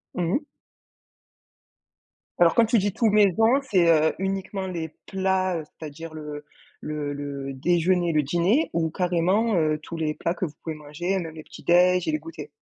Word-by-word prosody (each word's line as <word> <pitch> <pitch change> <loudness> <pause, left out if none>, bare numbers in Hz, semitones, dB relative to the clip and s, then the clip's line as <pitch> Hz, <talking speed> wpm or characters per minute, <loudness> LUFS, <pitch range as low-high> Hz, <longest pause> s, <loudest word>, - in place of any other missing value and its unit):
Mmh 175 0 -1
mh. - - +2 2.0
Alors 170 -1 +5
quand 235 - +6
tu 230 +2 +2
dis 200 -1 0
tout 230 - +1
maison, 210 +5 +4
c'est, 175 -4 +4
heu, 160 -1 +3
uniquement 195 0 -3
les 165 -3 -4 0.2
plats, 190 -1 0
heu, 160 - -5
c'est-à-dire 155 +1 -10
le 150 -1 -7 0.4
le 150 -1 -4
le 140 -1 -5
déjeuner, 175 +4 +1
le 150 -1 +2
dîner 175 - +1
ou 165 -1 0
carrément, 185 +6 +1
heu, 155 -3 +2
tous 170 - -7
les 155 -1 -1
plats 170 - -2
que 180 - -3
vous 155 - -7
pouvez 160 -1 -4
manger, 165 +6 -3
même 165 -2 -7
les 155 - -9
petits - - -13
déj' 180 0 +4
et - - +2
les - - +2
goûters? 155 -2 -9
170 Hz, 180 wpm, -25 LUFS, 155-190 Hz, 2.0 s, quand